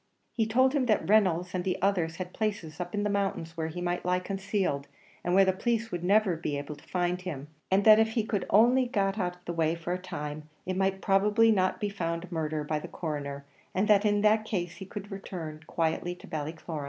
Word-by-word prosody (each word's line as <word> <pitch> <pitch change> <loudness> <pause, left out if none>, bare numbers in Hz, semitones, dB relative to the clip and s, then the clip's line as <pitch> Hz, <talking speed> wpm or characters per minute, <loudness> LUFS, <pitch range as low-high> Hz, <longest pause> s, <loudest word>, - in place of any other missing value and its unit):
He 225 -2 +1
told 260 +4 +3
him 270 -4 +1
that 215 -3 +2
Reynolds 180 -4 +3
and 185 0 0
others 175 -4 +1
had 180 +1 -6
places 200 -8 -3
up 180 +2 -4
in 205 - 0
the 210 - 0
mountains 195 -5 -2
where 160 -1 -2
he 170 +2 -6
might 175 0 -1
lie 180 0 +2
concealed, 190 -6 -2 0.4
and 175 +1 +1
where 195 0 +7
the 190 - +3
police 230 +3 -1
would 175 -1 -3
never 195 -1 +3
be 155 -3 -3
able 145 +1 -5
to - - -19
find 180 0 0
him; 150 -6 -6 0.2
and 195 +2 +3
that 215 0 +9
if 220 0 +2
he 225 -2 0 0.2
only 245 +5 +5
got 200 -3 0
out 180 -2 -1
of 180 - -26
the 170 - -3
way 165 -1 +1
for 170 +1 -3
a 180 - -2
time, 150 -4 -6 0.2
it 185 - -2
might 195 0 0
probably 210 +3 +4
not 185 -3 +1
be 210 - -1
found 170 -2 -3
murder 155 -2 -2
by 150 0 -1
the - - -7
Coroner, 140 -3 -5 0.3
and 195 +3 +2
that 205 -1 +5
in 205 -1 +2
that 215 +1 +4
case 180 -6 -3
he 190 - -8
could 205 +1 -7
return 170 -5 -6
quietly 170 +1 -1
to - - -14
Ballycloran. 160 0 -5
185 Hz, 225 wpm, -29 LUFS, 165-205 Hz, 0.4 s, that